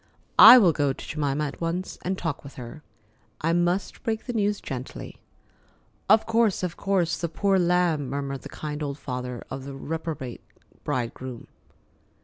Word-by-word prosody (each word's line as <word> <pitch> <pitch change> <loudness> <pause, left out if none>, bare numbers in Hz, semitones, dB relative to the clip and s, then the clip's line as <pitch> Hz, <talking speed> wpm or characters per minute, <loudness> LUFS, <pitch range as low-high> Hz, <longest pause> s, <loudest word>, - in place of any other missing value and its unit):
I 230 +4 +12
will 195 -8 +6
go 145 -3 0
to - - -10
Jemima 150 -1 -1
at 140 - -7
once 170 +3 -3
and 190 +1 -2
talk 160 -6 -3
with 140 - -11
her. 125 +4 -9 0.6
I 165 +2 +1
must 175 +3 0
break 220 -2 -2
the 245 - -4
news 205 -2 0
gently——" 130 -1 -7 0.9
"Of 220 - +6
course, 225 -4 +2
of 180 -2 -2
course—the 175 -3 0
poor 195 +3 +1
lamb!" 175 -5 +2
murmured 140 0 -4
the - - -10
kind 150 0 -6
old 140 -1 -3
father 125 -3 -5
of 135 0 -5
the 140 -1 -7
reprobate 150 -3 -5 0.4
bridegroom. 125 -2 -4
160 Hz, 155 wpm, -25 LUFS, 135-185 Hz, 0.9 s, I